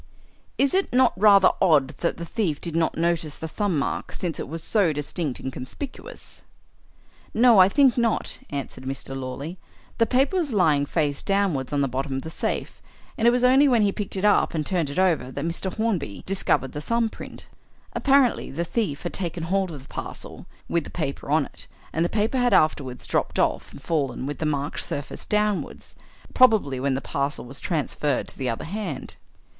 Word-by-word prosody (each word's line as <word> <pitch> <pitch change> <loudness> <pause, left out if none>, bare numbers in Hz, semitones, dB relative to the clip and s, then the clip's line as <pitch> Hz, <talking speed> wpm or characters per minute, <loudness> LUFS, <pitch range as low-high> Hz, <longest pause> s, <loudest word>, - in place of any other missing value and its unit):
"Is 275 +3 +2
it 385 +1 +1
not 255 -1 +4
rather 200 -1 +6
odd 155 -8 +4
that 170 - -1
the 170 - -5
thief 170 -6 -1
did 170 -2 -4
not 165 -1 +1
notice 165 -2 0
the 160 - -6
thumb 195 0 -1
mark, 140 - -2
since 170 -4 -4
it - - -4
was 165 +2 -6
so 200 -7 +3
distinct 150 -1 -3
and 130 - -5
conspicuous?" 275 - -8 0.9
"No, 230 -2 +6
I 185 +1 +8
think 270 0 +4
not," 230 -2 0
answered 135 -2 -6
Mr. 135 0 -5
Lawley. 135 +7 -5 0.4
"The 230 - +4
paper 270 +9 +2
was 310 -8 -1
lying 150 -8 +3
face 145 -3 0
downwards 190 -10 0
on 145 -1 +1
the 140 - +2
bottom 135 +2 -3
of 135 - -2
the 160 - -7
safe, - - -3 0.3
and 230 - +2
it - - +7
was 245 0 +1
only 265 +3 +6
when 240 -5 +4
he 200 - +3
picked 200 0 -4
it 190 +1 -1
up 205 - +3
and 155 -2 -1
turned 170 -5 0
it 140 - -6
over 170 -9 +2
that 140 +3 -4
Mr. 170 +3 -2
Hornby 190 - -2
discovered 185 -8 0
the 150 - -5
thumb 230 +7 +1
print. - - -9 0.5
Apparently 275 -3 +3
the 170 +5 -3
thief 175 -7 -2
had 175 - -4
taken 175 -3 -3
hold 190 +2 0
of 145 -5 -8
the - - -18
parcel, - - -8 0.2
with 170 -2 0
the - - -9
paper 140 -5 -4
on 150 -1 +3
it, - - -6 0.3
and 165 - +1
the 175 - +1
paper 220 +4 0
had 245 -1 +4
afterwards 135 -5 +1
dropped - - -1
off - - 0
and - - -12
fallen 145 -6 -1
with 145 +1 -4
the 155 - 0
marked 145 0 -2
surface 145 +1 -5
downwards 210 -1 -1 0.4
probably 215 - +4
when 135 0 0
the 135 - -2
parcel 140 0 -2
was 135 +3 -4
transferred 150 -4 -1
to - - -11
the 130 -2 -1
other 115 - -3
hand." 180 -6 -5
170 Hz, 200 wpm, -24 LUFS, 140-210 Hz, 0.9 s, I